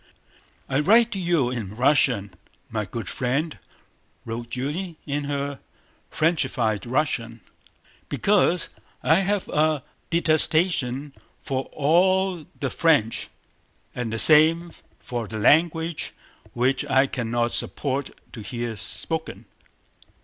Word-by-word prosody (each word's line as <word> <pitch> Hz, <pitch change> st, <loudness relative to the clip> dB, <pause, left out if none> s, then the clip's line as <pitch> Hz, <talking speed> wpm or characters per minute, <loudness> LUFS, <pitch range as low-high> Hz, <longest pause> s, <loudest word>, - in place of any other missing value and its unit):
"I 135 Hz, +1 st, 0 dB
write 225 Hz, +7 st, +4 dB
you 170 Hz, -9 st, +1 dB
in 110 Hz, -5 st, -5 dB
Russian, 125 Hz, -5 st, +2 dB, 0.4 s
my 105 Hz, -2 st, -2 dB
good 115 Hz, +4 st, -6 dB
friend," 140 Hz, +6 st, -2 dB, 0.7 s
wrote 115 Hz, +1 st, -5 dB
Julie 150 Hz, +8 st, -4 dB
in 145 Hz, 0 st, -2 dB
her 140 Hz, -1 st, -3 dB, 0.5 s
Frenchified 135 Hz, -, 0 dB
Russian, 120 Hz, -4 st, -1 dB, 0.7 s
"because 180 Hz, -4 st, +2 dB, 0.3 s
I 160 Hz, -, +5 dB
have 195 Hz, 0 st, 0 dB
a 155 Hz, -2 st, +1 dB, 0.3 s
detestation 155 Hz, -4 st, +2 dB, 0.3 s
for 135 Hz, -1 st, -3 dB
all 180 Hz, +3 st, +1 dB
the 135 Hz, -3 st, -2 dB
French, 145 Hz, -10 st, +2 dB, 0.7 s
and 120 Hz, -3 st, -4 dB
the 115 Hz, -, -2 dB
same 160 Hz, +5 st, +5 dB, 0.3 s
for 120 Hz, -3 st, -5 dB
their 110 Hz, +2 st, -5 dB
language 160 Hz, +5 st, +2 dB, 0.4 s
which 130 Hz, +2 st, +1 dB
I 135 Hz, +1 st, +3 dB
cannot 120 Hz, -2 st, -1 dB
support 140 Hz, -1 st, -2 dB, 0.2 s
to 115 Hz, -, -7 dB
hear 120 Hz, +1 st, -4 dB
spoken.... -, -, -3 dB
140 Hz, 105 wpm, -24 LUFS, 120-165 Hz, 0.7 s, I